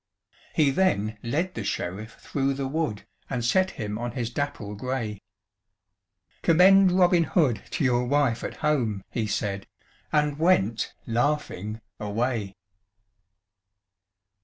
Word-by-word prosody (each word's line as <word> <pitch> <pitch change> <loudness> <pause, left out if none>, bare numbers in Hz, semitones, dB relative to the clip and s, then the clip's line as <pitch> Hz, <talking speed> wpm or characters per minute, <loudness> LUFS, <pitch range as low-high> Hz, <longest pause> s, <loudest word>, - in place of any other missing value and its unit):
He 150 -3 +4
then 110 - +1
led 165 +10 -1
the - - -4
Sheriff 105 +6 -4
through 135 -1 -1
the 135 -1 -2
wood, 135 -8 -2 0.2
And 120 -3 -2
set 185 +9 +3
him 105 -1 -3
on 120 -1 -3
his 120 -2 -3
dapple 140 -7 -3
grey; 110 -2 -3 1.2
"Commend 185 +3 +6
Robin 180 -1 +4
Hood 140 - +2
to - - -2
your 125 -1 +2
wife 135 -4 +1
at - - -4
home," 115 -10 +1
He 115 -3 -1
said, 100 -2 -2 0.4
and 150 -1 +1
went 115 - +2
laughing 115 -4 -1 0.2
away. 105 -1 -2
125 Hz, 120 wpm, -26 LUFS, 110-150 Hz, 1.2 s, Commend